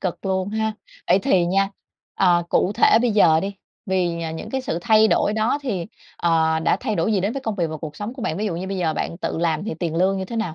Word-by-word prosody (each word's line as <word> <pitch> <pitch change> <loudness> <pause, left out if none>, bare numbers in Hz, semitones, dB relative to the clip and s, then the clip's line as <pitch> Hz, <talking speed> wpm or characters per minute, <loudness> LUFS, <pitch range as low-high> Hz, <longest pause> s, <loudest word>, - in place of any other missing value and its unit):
cực 185 0 -4
luôn 190 0 0
ha. 220 0 -1 0.4
Vậy 190 - +5
thì 180 -2 +2
nha, 195 +2 +2 0.5
ờ, 175 -2 +3
cụ 195 - +2
thể - - +5
bây 245 - +2
giờ 165 -6 +5
đi 200 +1 -4 0.3
vì, 175 -3 0
à, 160 - -3
những 160 - -7
cái 265 -1 -1
sự 170 -9 -3
thay 220 +3 +4
đổi 210 - +2
đó 220 +6 +1
thì, 195 -10 -3 0.3
ờ, 160 -1 +2
đã - - +2
thay 215 - -2
đổi 170 +6 0
gì 195 - +2
đến 200 +5 -1
với 275 - -4
công 220 -4 -2
việc 175 -4 0
và 155 0 -5
cuộc 150 -1 -8
sống 210 +4 -5
của 260 - -8
bạn, 160 - -2
ví 215 +3 -2
dụ 170 -4 -2
như 185 +2 -4
bây 195 0 -3
giờ 160 -3 0
bạn 170 - -3
tự - - -3
làm 165 0 0
thì 215 - -3
tiền 165 0 -3
lương 190 +2 +2
như 190 - -3
thế 230 - -6
nào? 200 -8 -2
190 Hz, 280 wpm, -22 LUFS, 170-215 Hz, 0.5 s, Vậy